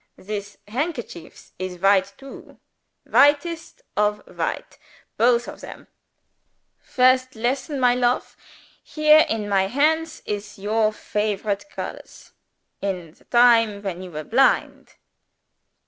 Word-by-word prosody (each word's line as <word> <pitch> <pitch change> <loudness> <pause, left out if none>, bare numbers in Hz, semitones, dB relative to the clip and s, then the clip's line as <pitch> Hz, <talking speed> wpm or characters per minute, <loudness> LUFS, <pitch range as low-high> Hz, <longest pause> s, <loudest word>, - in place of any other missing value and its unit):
"This 205 0 -7
handkerchief 240 - -6
is 185 -1 -5
white, 195 +1 +2
too; 270 0 -13 0.5
whitest 295 +4 +2
of 210 0 0
white, - - -4 0.4
both 240 +1 +2
of - - -9
them. - - -10 0.9
First 255 0 +2
lesson, 265 +5 -2
my 250 -1 +4
lofe! 245 0 0 0.5
Here 305 0 +4
in 220 -2 -2
my 195 -1 +2
hands 315 +6 0
is 205 0 -5
your 215 +2 +1
favorite 210 +2 -3
colors, - - -9 0.5
in 180 -5 -4
the - - -27
time 230 -4 +4
when 185 -3 -4
you 185 - -8
were 155 -2 -6
blind." 260 - +1
220 Hz, 115 wpm, -22 LUFS, 200-260 Hz, 0.9 s, my